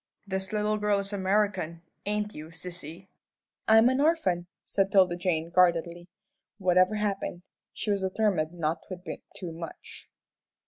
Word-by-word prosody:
"This 190 -1 -3
little 210 0 0
girl 210 -1 +2
is 200 +1 -3
American, 190 -4 0 0.2
ain't 210 0 -1
you, 155 +1 -8
sissy?" 170 +1 -9 0.6
"I'm 225 +2 +7
an 260 +2 +2
orphan," 195 - +2 0.2
said 195 0 0
'Tilda 185 -3 +5
Jane, 170 -2 -1
guardedly. 175 -1 +3 0.5
Whatever 185 +1 +4
happened, 200 -4 -2 0.3
she 210 - -2
was 200 -1 +1
determined 190 -4 +1
not 165 -1 -1
to 185 - -5
admit 180 0 -8
too 180 -3 -6
much. 165 0 -9
185 Hz, 140 wpm, -28 LUFS, 175-210 Hz, 0.6 s, I'm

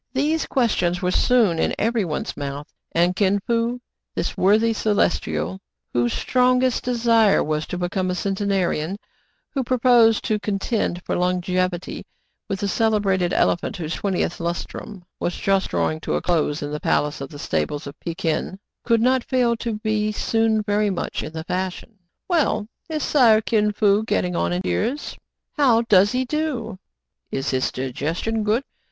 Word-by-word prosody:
These 300 +4 0
questions 195 -8 +1
were 180 - +1
soon 215 -7 +3
in - - +1
every 225 0 +1
one's 155 -4 -3
mouth; 140 +1 -5 0.3
and 175 +2 +2
Kin 200 0 +2
Fo, 235 +1 0 0.4
this - - -2
worthy 220 +4 +3
Celestial 205 -3 0 0.2
" - - -55
whose 120 -1 +1
strong 250 0 +2
est 255 -2 +1
desire 230 -4 +3
was 155 0 -2
to 180 - -4
become 185 +1 -1
a 180 - -1
centenarian," 195 -3 -1 0.5
who 270 -2 -1
pro 255 +1 0
posed 235 -3 +5
to 215 -1 0
contend 200 -3 -2
for - - -1
longevity 180 0 -1 0.5
with 195 -2 -3
the 200 - 0
celebrated 200 -4 +1
elephant 185 +4 +1
whose 165 -2 -4
twentieth 190 -3 -1
lustrum 175 +3 -5 0.2
was 175 - -2
just 195 -1 +1
draw - - +1
ing 155 - -5
to - - -2
a - - -1
close 155 -4 0
in 145 - -4
the 150 - -3
Palace 150 -1 0
of 135 - -5
the 145 - -10
Stables 145 - -2
of 140 - -7
Pé 165 -1 -5
kin, 165 +3 -1 0.3
could 230 -2 +2
not 255 +1 +3
fail 245 -3 +1
to 230 0 -3
be 215 -1 0
soon 220 0 +1
very 205 0 +1
much 190 - -3
in 155 - -6
the 160 0 -5
fashion. 185 +4 -4
" - - -59
Well, 325 - +1 0.2
is 310 -2 -2
Sire 235 -7 +5
Kin 210 -1 +1
Fo 205 0 +3
getting 180 -5 -1
on 85 - 0
in 90 +1 -1
years 90 - -1
} - - -61
" - - -60
" - - -60
How 240 -5 +4
does 205 -3 +5
he 255 +1 0
do 305 -3 -1
.«^ 220 -3 -8 0.2
" - - -60
" - - -55
Is 135 +1 -2
his 130 -1 0
digestion 160 - -2
good 215 +5 +1
200 Hz, 185 wpm, -22 LUFS, 175-230 Hz, 0.5 s, posed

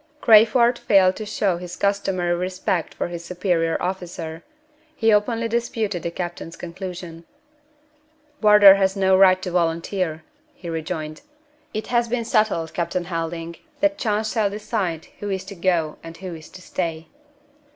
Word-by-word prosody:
Crayford 235 +2 +5
failed 190 -2 +4
to 215 - -6
show 195 -4 0
his 180 0 -8
customary 195 -3 0
respect 180 -1 -2
for - - -2
his 170 -1 -6
superior 175 -2 0
officer. 175 -3 -5 0.5
He 225 -5 +3
openly 225 +2 +1
disputed 225 -5 -2
the 170 - -3
captain's 175 -1 -6
conclusion. 175 -1 -8 1.2
"Wardour 210 -2 +9
has 190 0 +1
no 190 -1 +3
right 185 -1 +6
to 180 - -3
volunteer," 170 -1 -1 0.3
he 175 - -8
rejoined. 155 -1 -5 0.5
"It 215 - -4
has 240 0 +3
been 235 0 -2
settled, 210 -8 +1
Captain 175 +1 -2
Helding, 165 -1 -4 0.2
that 300 0 +1
chance 215 -2 0
shall 215 -4 +1
decide 200 -5 -3
who 205 - -4
is 190 -1 -2
to 195 - -8
go 170 -3 0
and 165 0 -10
who 185 -2 -7
is 160 -1 -11
to 185 - -13
stay." 165 -2 -4
185 Hz, 150 wpm, -22 LUFS, 170-210 Hz, 1.2 s, Wardour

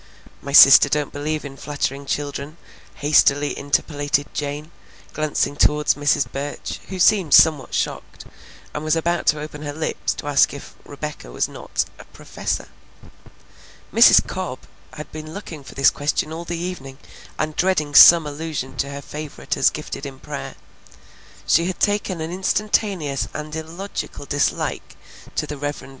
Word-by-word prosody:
"My 140 - -7
sister 140 0 +9
don't 150 0 -1
believe 150 +1 -3
in 135 -1 -9
flattering 140 -1 -4
children," 145 +2 -4 0.4
hastily 145 -1 +3
interpolated 145 0 -1
Jane, 150 +2 -5 0.4
glancing 155 -1 -1
toward 150 0 +2
Mrs. 145 -1 +2
Burch, 140 +2 -5
who 190 - -6
seemed 185 -4 +4
somewhat 150 -6 +4
shocked, - - -4 0.5
and 150 - -5
was 155 +1 +1
about 170 +1 -1
to 150 - +3
open 150 0 -8
her 145 -1 -5
lips 155 +1 -2
to - - -8
ask 145 0 +3
if 140 - -11
Rebecca 145 - -7
was - - -1
not - - -3
a - - -12
"professor." - - -5 1.2
Mrs. - - +7
Cobb - - -5 0.3
had 150 - -9
been 155 +1 -8
looking 165 -7 -8
for - - -13
this 135 0 +5
question 150 +2 -2
all 170 +1 -6
the 170 0 -4
evening 165 -7 -6 0.4
and 155 0 -2
dreading 170 -6 0
some 165 +2 +9
allusion 145 -3 -5
to 140 +3 -1
her 140 0 -7
favorite 150 -1 -5
as - - +4
gifted 140 - -7
in 135 -1 -10
prayer. - - -7 0.9
She 170 +2 +3
had 185 - -4
taken 205 -4 0
an 160 +1 -4
instantaneous 190 -5 -1
and 155 0 -6
illogical 160 0 -6
dislike 145 0 -2 0.4
to - - -1
the 150 - -7
Rev. 145 +1 -4
Mr. - - -12
150 Hz, 155 wpm, -21 LUFS, 145-160 Hz, 1.2 s, sister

